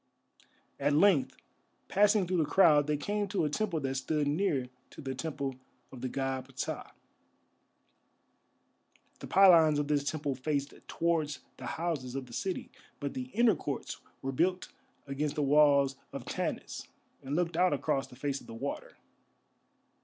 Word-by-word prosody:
At 145 - +2
length, 160 -2 +4 0.5
passing 205 0 +4
through 180 0 0
the 155 - +3
crowd, 150 -2 +5
they 150 0 +1
came 205 +7 -1
to 190 -4 0
a 150 - -1
temple 195 -3 -1
that 135 -1 -1
stood 145 +3 -1
near 145 -4 +1 0.2
to - - -14
the 135 -3 -4
Temple 135 -2 -4 0.3
of 130 - -10
the 130 - -2
God 135 -1 -2
Ptah. - - -4 2.3
The - - -8
pylons 170 -6 +6
of 145 -1 0
this 145 -1 +2
temple 145 -1 -2
faced 140 +1 -2
towards 160 -4 0 0.2
the - - -7
houses 155 -7 -2
of 135 -1 -3
the 120 - -14
city, 190 +9 -3 0.3
but 140 -1 -3
the 125 -1 -4
inner 235 -1 +5
courts 145 -6 -5 0.2
were 135 - -1
built 180 +7 0 0.4
against 140 +1 -2
the 150 - 0
walls 140 -1 +4
of - - -7
Tanis - - -4 0.3
and 135 +2 -3
looked 170 0 0
out 180 +2 +4
across 135 -1 0
the - - -14
face 140 +1 -3
of - - -16
the 115 - -8
water. - - -5
145 Hz, 160 wpm, -31 LUFS, 135-170 Hz, 2.3 s, pylons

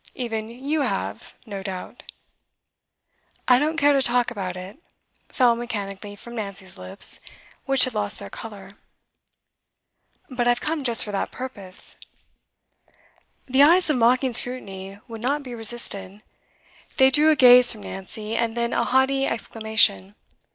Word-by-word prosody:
Even 225 -3 -5
you 275 +6 -3
have, 150 - -4
no 200 -4 -7
doubt?' 190 -1 -8 1.5
'I 250 -1 +5
don't 310 +3 -1
care 290 -2 +4
to 275 - +2
talk 245 -1 +1
about 185 -5 -5
it,' 190 +9 -10 0.5
fell 245 -3 +2
mechanically 205 -4 -6
from 235 +4 -12
Nancy's 200 -4 -7
lips, 90 0 -5 0.5
which 270 -2 +4
had 255 - +1
lost 210 -1 -2
their - - -10
colour. 200 -4 -10 1.6
'But 245 -5 -2
I've 240 0 +2
come 310 +2 -3
just 235 -3 +4
for 210 - -6
that 200 - -3
purpose.' 205 -8 +3 1.5
The 265 +1 +2
eyes 335 +3 +5
of 285 - 0
mocking 250 +2 +2
scrutiny 200 -6 0
would 225 -2 -9
not 285 +4 -1
be 250 -2 -9
resisted. 215 -3 0 0.7
They 265 -1 +5
drew 300 +3 +4
a 310 - +4
gaze 250 -3 +7
from 215 -3 -6
Nancy, 210 +3 -6
and 230 0 -2
then 235 0 -2
a - - 0
haughty 270 +1 +1
exclamation. 220 - 0
235 Hz, 145 wpm, -23 LUFS, 200-260 Hz, 1.6 s, gaze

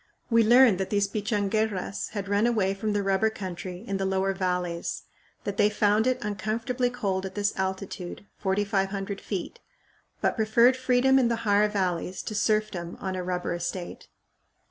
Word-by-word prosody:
We 230 0 +6
learned 235 -3 +6
that 190 - -2
these 200 -1 +2
Pichanguerras 205 -1 -1
had 200 -2 -4
run 205 +3 +2
away 205 -5 +1
from 210 +2 -2
the 205 -1 0
rubber 195 +3 +2
country 185 -1 -7
in 195 - -1
the 195 - -2
lower 190 0 +1
valleys; 180 -2 -2 0.4
that 200 - -4
they 210 0 +4
found 210 +2 +2
it 255 - +2
uncomfortably 225 +5 -1
cold 195 -6 -2
at 190 -1 -6
this 205 0 0
altitude, 190 0 -4
4500 195 0 -1
feet, 195 -4 -5 0.6
but - - +1
preferred 235 +3 +4
freedom 260 +1 +3
in 250 - +3
the 235 - +1
higher 205 0 +4
valleys 185 -3 -2
to - - -5
serfdom 215 -5 0
on 190 -1 -3
a 185 - -3
rubber 180 0 -2
estate. 175 +1 -5
200 Hz, 165 wpm, -27 LUFS, 190-215 Hz, 0.6 s, We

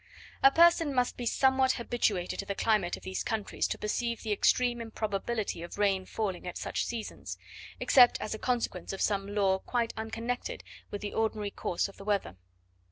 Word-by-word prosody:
A 270 - +9
person 330 -1 +5
must 250 -1 +1
be 240 - -4
somewhat 265 +1 +3
habituated 220 -7 -1
to 200 - -2
the 200 - -2
climate 210 -6 +1
of - - -15
these 185 0 -3
countries 220 -3 -1
to - - -3
perceive 235 +2 -2
the 220 - -3
extreme 240 +3 +2
improbability 215 -3 -3
of 170 - -8
rain 195 -2 +1
falling 190 -5 -3
at 180 - -5
such - - -2
seasons, 230 -2 -5 0.4
except 250 -2 +6
as 215 - -3
a 220 - -5
consequence 245 -4 -1
of 195 - -5
some 200 0 0
law 190 -2 +3
quite 235 +2 -1
unconnected 230 - -4 0.3
with 205 - -5
the 205 - -4
ordinary 215 -2 -1
course 175 - -1
of 200 - -14
the - - -10
weather. 200 - -1
220 Hz, 180 wpm, -30 LUFS, 200-240 Hz, 0.4 s, A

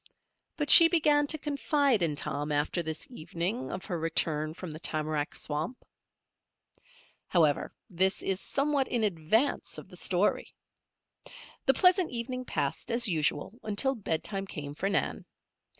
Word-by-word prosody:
But 295 -1 +1
she 335 - +11
began 295 -3 +2
to 310 - +1
confide 285 - +1
in 160 -3 +1
Tom 145 +1 -2
after 145 +4 0
this 160 - -2
evening 175 +4 -4
of 185 - -6
her 175 -5 -3
return 155 -1 -1
from 180 -2 -7
the 155 - -8
tamarack 155 -2 -2
swamp. 155 +12 -3 1.4
However, 155 -5 +2 0.2
this 190 -1 0
is 190 -1 0
somewhat 280 -1 0
in 235 -2 -1
advance 210 - 0
of - - -10
the - - -13
story. - - 0 1.1
The 270 - +5
pleasant 365 +1 +4
evening 250 +1 -4
passed - - -3
as 235 0 +4
usual 160 +1 0
until 220 +6 0
bedtime 195 -2 -3
came 145 -5 -6
for 195 +6 -2
Nan. 200 - -1
195 Hz, 140 wpm, -29 LUFS, -, 1.4 s, she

